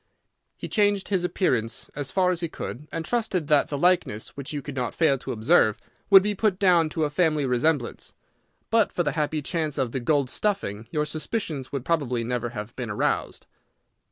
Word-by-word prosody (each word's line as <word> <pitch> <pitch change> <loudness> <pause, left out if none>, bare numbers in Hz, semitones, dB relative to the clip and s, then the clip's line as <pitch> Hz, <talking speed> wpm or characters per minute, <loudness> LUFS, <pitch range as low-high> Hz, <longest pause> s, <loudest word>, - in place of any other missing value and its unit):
He - - -6
changed 205 -2 +1
his 190 -3 +1
appearance 120 - -1
as 145 -2 -3
far 185 -1 +2
as 175 - -2
he 170 - -1
could, 150 +1 -7
and 165 - -4
trusted 220 -8 0
that 150 -2 +4
the 145 - -3
likeness, 175 - +1
which 140 -1 -7
you 150 - -3
could 145 - -6
not 125 -2 -2
fail 160 -5 +3
to - - -6
observe, 110 -1 +3 0.3
would 195 -2 +9
be 210 +1 0
put 205 -2 +1
down 175 -5 +4
to 160 0 -1
a 150 - +1
family 155 -3 +2
resemblance. 125 +1 -1 0.6
But 225 -2 +3
for 175 - 0
the - - 0
happy 150 -1 -1
chance 155 -2 -2
of 130 -4 0
the 130 - -2
gold 140 0 +1
stuffing, 115 - -2
your 150 +2 -1
suspicions 155 - -4
would 135 -2 -4
probably 130 -8 0
never 120 0 -2
have 110 0 -7
been 125 -3 -5
aroused." 105 - -1
150 Hz, 195 wpm, -25 LUFS, 125-180 Hz, 0.6 s, would